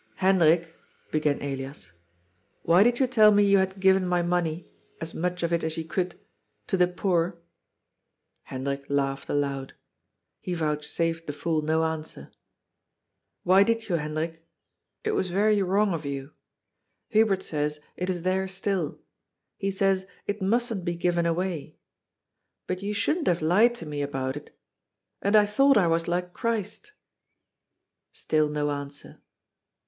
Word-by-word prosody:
" -, -, -37 dB
Hendrik," 170 Hz, -3 st, +4 dB, 0.4 s
began 150 Hz, -2 st, +1 dB
Elias, 135 Hz, -, -6 dB, 0.3 s
" 95 Hz, +3 st, -43 dB
why 170 Hz, +3 st, +5 dB
did 240 Hz, +3 st, +4 dB
you 265 Hz, -, +3 dB
tell 225 Hz, -4 st, +6 dB
me 205 Hz, 0 st, +5 dB
you 200 Hz, -1 st, +5 dB
had 190 Hz, +1 st, -1 dB
given 190 Hz, -1 st, +4 dB
my 175 Hz, -1 st, +1 dB
money 175 Hz, -1 st, -1 dB, 0.2 s
— -, -, -37 dB
^as 165 Hz, 0 st, -6 dB
much 180 Hz, +1 st, -2 dB
of 170 Hz, 0 st, 0 dB
it 170 Hz, -, +1 dB
as 160 Hz, 0 st, -2 dB
you 165 Hz, -, -2 dB
could 180 Hz, +2 st, -3 dB, 0.2 s
— -, -, -49 dB
to -, -, +1 dB
the 180 Hz, -1 st, +4 dB
poor?" 175 Hz, -1 st, 0 dB, 1.1 s
Hendrik 140 Hz, +1 st, -4 dB
laughed 135 Hz, -1 st, -1 dB
aloud. 140 Hz, -2 st, -2 dB, 0.6 s
He 180 Hz, -, -4 dB
vouchsafed 165 Hz, +1 st, -2 dB
the 145 Hz, -, -3 dB
fool 160 Hz, +1 st, -1 dB
no 160 Hz, +1 st, +1 dB
answer. 160 Hz, -, -4 dB, 0.6 s
" -, -, -55 dB
Why 185 Hz, +2 st, +5 dB
did 225 Hz, +1 st, +1 dB
you, 175 Hz, -, +2 dB
Hendrik? 160 Hz, +2 st, -4 dB, 0.6 s
It 435 Hz, -, 0 dB
was 190 Hz, -, 0 dB
very 205 Hz, +3 st, +3 dB
wrong 195 Hz, +1 st, +2 dB
of 160 Hz, -2 st, -3 dB
you. 140 Hz, 0 st, -5 dB, 0.8 s
Hubert 210 Hz, -4 st, +3 dB
says 150 Hz, -1 st, -2 dB, 0.2 s
it 180 Hz, +1 st, -3 dB
is 175 Hz, -2 st, -2 dB
there 190 Hz, +1 st, 0 dB
still. 190 Hz, -4 st, -2 dB, 0.6 s
He 195 Hz, -, -2 dB
says 195 Hz, -1 st, +1 dB, 0.2 s
it 205 Hz, 0 st, -3 dB
mustn't 225 Hz, 0 st, 0 dB
be 175 Hz, -1 st, -2 dB
given 170 Hz, 0 st, +1 dB
away. 170 Hz, -2 st, -2 dB, 0.9 s
But 185 Hz, 0 st, -3 dB
you 205 Hz, +1 st, -3 dB
shouldn't 310 Hz, -, 0 dB
have 170 Hz, -2 st, +1 dB
lied 215 Hz, +9 st, +4 dB
to 170 Hz, -, -8 dB
me 145 Hz, -1 st, -4 dB
about 135 Hz, -2 st, -2 dB
it. 145 Hz, -, -11 dB, 0.6 s
And 200 Hz, +2 st, +2 dB
I 210 Hz, -1 st, +7 dB
thought 270 Hz, +6 st, +4 dB
I 195 Hz, -, +4 dB
was 165 Hz, 0 st, +1 dB
like 180 Hz, +1 st, -2 dB
Christ." 230 Hz, -, -3 dB, 1.2 s
Still 155 Hz, -1 st, 0 dB
no 150 Hz, 0 st, -1 dB
answer. 145 Hz, 0 st, -7 dB
175 Hz, 160 wpm, -26 LUFS, 150-195 Hz, 1.2 s, I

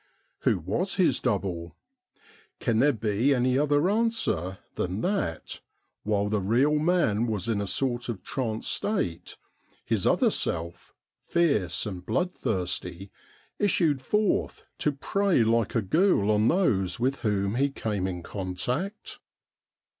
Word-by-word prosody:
Who -, -, +2 dB
was -, -, -2 dB
his -, -, +3 dB
double? 85 Hz, -2 st, -2 dB, 0.8 s
Can 115 Hz, -2 st, +1 dB
there 145 Hz, +4 st, +5 dB
be 115 Hz, +3 st, +1 dB
any 125 Hz, 0 st, +2 dB
other 145 Hz, +3 st, +2 dB
answer 210 Hz, -, 0 dB, 0.2 s
than 95 Hz, +4 st, -2 dB
that, 185 Hz, -, -2 dB, 0.4 s
while 105 Hz, -1 st, 0 dB
the 105 Hz, 0 st, 0 dB
real 130 Hz, +10 st, +2 dB
man 150 Hz, -, +2 dB
was 110 Hz, -1 st, -2 dB
in 110 Hz, -3 st, 0 dB
a 100 Hz, -, -3 dB
sort 120 Hz, +3 st, -1 dB
of 110 Hz, -5 st, -5 dB
trance 115 Hz, -4 st, -3 dB
state, 190 Hz, -, -2 dB, 0.5 s
his -, -, 0 dB
other -, -, +3 dB
self, 85 Hz, 0 st, -3 dB, 0.3 s
fierce 140 Hz, -, +1 dB
and 95 Hz, -4 st, -5 dB
bloodthirsty, 95 Hz, -, -2 dB, 0.5 s
issued 165 Hz, -9 st, +2 dB
forth 210 Hz, +8 st, 0 dB, 0.2 s
to 150 Hz, -, +1 dB
prey 190 Hz, +1 st, +1 dB
like 115 Hz, 0 st, +1 dB
a 115 Hz, -, +2 dB
ghoul 130 Hz, -, +3 dB
on 105 Hz, +1 st, +3 dB
those 100 Hz, -, +1 dB
with 130 Hz, +3 st, +1 dB
whom 100 Hz, -4 st, 0 dB
he 140 Hz, +4 st, +2 dB
came 105 Hz, -8 st, -2 dB
in 90 Hz, -2 st, -5 dB
contact 125 Hz, -, -4 dB
115 Hz, 130 wpm, -27 LUFS, 100-150 Hz, 0.8 s, there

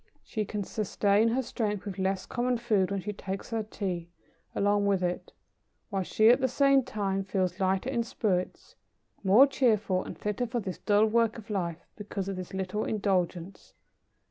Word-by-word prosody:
She 215 Hz, -2 st, -3 dB
can 205 Hz, 0 st, -3 dB
sustain 205 Hz, +1 st, +1 dB
her 250 Hz, +3 st, +1 dB
strength 210 Hz, -4 st, -2 dB
with 195 Hz, -2 st, -5 dB
less 190 Hz, 0 st, 0 dB
common 245 Hz, 0 st, 0 dB
food 210 Hz, -5 st, +1 dB
when 200 Hz, -1 st, -2 dB
she 210 Hz, +2 st, -4 dB
takes 195 Hz, +1 st, -6 dB
her 225 Hz, -1 st, 0 dB
Tea 185 Hz, -5 st, -4 dB, 0.5 s
along 205 Hz, 0 st, +2 dB
with 195 Hz, -2 st, +2 dB
it: 180 Hz, 0 st, -2 dB, 0.6 s
while 195 Hz, -1 st, 0 dB
she, 215 Hz, +4 st, +4 dB
at 250 Hz, +3 st, +5 dB
the 260 Hz, -, +3 dB
same 275 Hz, +2 st, +4 dB
time, 200 Hz, -6 st, -2 dB
feels 185 Hz, -1 st, -1 dB
lighter 190 Hz, +6 st, +1 dB
in 240 Hz, -3 st, +1 dB
spirits, 210 Hz, -6 st, -2 dB, 0.5 s
more 205 Hz, +8 st, +7 dB
cheerful, 215 Hz, -9 st, +1 dB
and -, -, -8 dB
fitter 210 Hz, +4 st, -2 dB
for 240 Hz, +1 st, -2 dB
this 190 Hz, -4 st, -5 dB
dull 210 Hz, 0 st, +3 dB
work 230 Hz, 0 st, +2 dB
of 220 Hz, 0 st, -9 dB
life, 175 Hz, -4 st, -3 dB
because 200 Hz, -2 st, -5 dB
of 195 Hz, -, -3 dB
this 185 Hz, -1 st, -7 dB
little 190 Hz, +2 st, -2 dB
indulgence." 190 Hz, -3 st, -2 dB
205 Hz, 175 wpm, -29 LUFS, 190-225 Hz, 0.6 s, more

